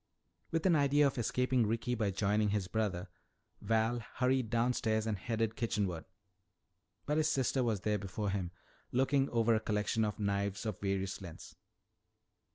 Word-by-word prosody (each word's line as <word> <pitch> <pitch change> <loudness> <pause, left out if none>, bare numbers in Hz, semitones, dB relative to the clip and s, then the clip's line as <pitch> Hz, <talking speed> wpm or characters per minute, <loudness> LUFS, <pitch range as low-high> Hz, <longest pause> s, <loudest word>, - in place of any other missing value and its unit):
With 165 +1 -1
an 180 -3 +5
idea 145 0 +4
of 135 -2 0
escaping 125 0 +1
Ricky 115 +3 -1
by 110 -4 0
joining 105 +2 +1
his 100 -2 -1
brother, 100 -5 -1 0.5
Val 115 +3 +1 0.2
hurried 130 -2 +1
downstairs 115 -2 +1
and 110 -2 0
headed 110 +2 -2
kitchenward. 100 -8 -1 1.0
But 150 +1 0
his 155 0 +3
sister 130 -2 +1
was 110 -5 0
there 105 0 0
before 100 +1 -3
him 95 -3 -2 0.4
looking 135 +2 +2
over 115 -1 +3
a 110 - +3
collection 110 +1 0
of 105 -1 -1
knives 100 +1 -1
of 105 -4 -4
various 95 -1 -2
lengths. 85 -4 -10
110 Hz, 155 wpm, -33 LUFS, 100-125 Hz, 1.0 s, an